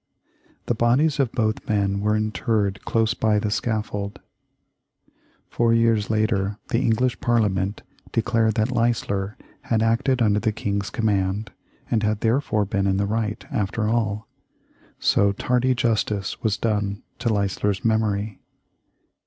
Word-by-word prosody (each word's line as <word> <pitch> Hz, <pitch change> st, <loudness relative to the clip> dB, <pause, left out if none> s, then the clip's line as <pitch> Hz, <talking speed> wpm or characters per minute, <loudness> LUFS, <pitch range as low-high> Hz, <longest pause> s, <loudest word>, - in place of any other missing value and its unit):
The -, -, +1 dB
bodies 130 Hz, +7 st, +2 dB
of 130 Hz, -4 st, +2 dB
both 110 Hz, -2 st, -1 dB
men 100 Hz, -2 st, +1 dB
were 105 Hz, +1 st, +1 dB
interred 110 Hz, -2 st, -1 dB
close 115 Hz, 0 st, +1 dB
by 110 Hz, -2 st, +1 dB
the 105 Hz, 0 st, -1 dB
scaffold. 105 Hz, -2 st, -2 dB, 1.3 s
Four 115 Hz, -1 st, +2 dB
years 115 Hz, -2 st, +2 dB
later 105 Hz, -2 st, 0 dB
the 115 Hz, -, +1 dB
English 125 Hz, 0 st, +1 dB
Parliament 105 Hz, -4 st, 0 dB, 0.3 s
declared 115 Hz, -2 st, +1 dB
that 110 Hz, +3 st, +1 dB
Leisler 115 Hz, -3 st, 0 dB, 0.3 s
had 110 Hz, -1 st, +1 dB
acted 125 Hz, +3 st, +2 dB
under 105 Hz, -3 st, +3 dB
the 110 Hz, -, 0 dB
King's 100 Hz, -1 st, -2 dB
command, 105 Hz, -3 st, -1 dB, 0.4 s
and 115 Hz, -, +2 dB
had 105 Hz, 0 st, 0 dB
therefore 115 Hz, -3 st, +1 dB
been 100 Hz, 0 st, 0 dB
in 95 Hz, 0 st, +2 dB
the 100 Hz, -, +1 dB
right, 105 Hz, 0 st, -2 dB
after 105 Hz, -3 st, -1 dB
all. 110 Hz, -1 st, -1 dB, 0.7 s
So 100 Hz, 0 st, +3 dB
tardy 125 Hz, +4 st, +1 dB
justice 110 Hz, -5 st, -1 dB
was 105 Hz, -3 st, 0 dB
done 105 Hz, -3 st, -1 dB, 0.2 s
to 120 Hz, -1 st, 0 dB
Leisler's 100 Hz, -1 st, 0 dB
memory. 110 Hz, -2 st, 0 dB
110 Hz, 135 wpm, -23 LUFS, 100-115 Hz, 1.3 s, under